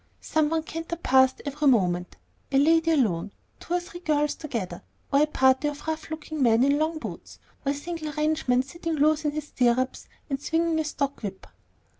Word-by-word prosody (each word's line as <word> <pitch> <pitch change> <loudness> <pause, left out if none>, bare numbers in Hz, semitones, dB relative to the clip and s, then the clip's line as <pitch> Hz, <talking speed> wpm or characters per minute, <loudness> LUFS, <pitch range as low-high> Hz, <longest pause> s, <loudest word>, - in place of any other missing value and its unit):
Some 310 -1 +1
one 320 0 0
cantered 330 +1 -6
past 260 0 +4
every 290 +1 -1
moment, 180 -8 +2 0.3
a 270 - +3
lady 325 +3 +4
alone, 215 - +1 0.3
two 350 - -3
or - - +2
three 350 0 -10
girls 300 -4 +1
together, 225 - -5 0.3
or 280 - +5
a 305 - +4
party 265 -1 +3
of 290 0 -5
rough 315 0 -3
looking 315 -1 -5
men 235 -1 +4
in 280 +2 +3
long 315 +1 0
boots, 310 - -8 0.3
or 275 - +1
a - - -2
single 310 +1 -5
ranchman 300 -5 +1
sitting 330 +4 -5
loose 305 +1 +2
in 295 - +2
his 305 -1 -5
stirrups, 255 +1 +1 0.2
and 275 -1 -3
swinging 325 +1 +1
a 315 - 0
stock 280 -2 -2
whip. 195 -3 -6
295 Hz, 190 wpm, -26 LUFS, 260-315 Hz, 0.3 s, or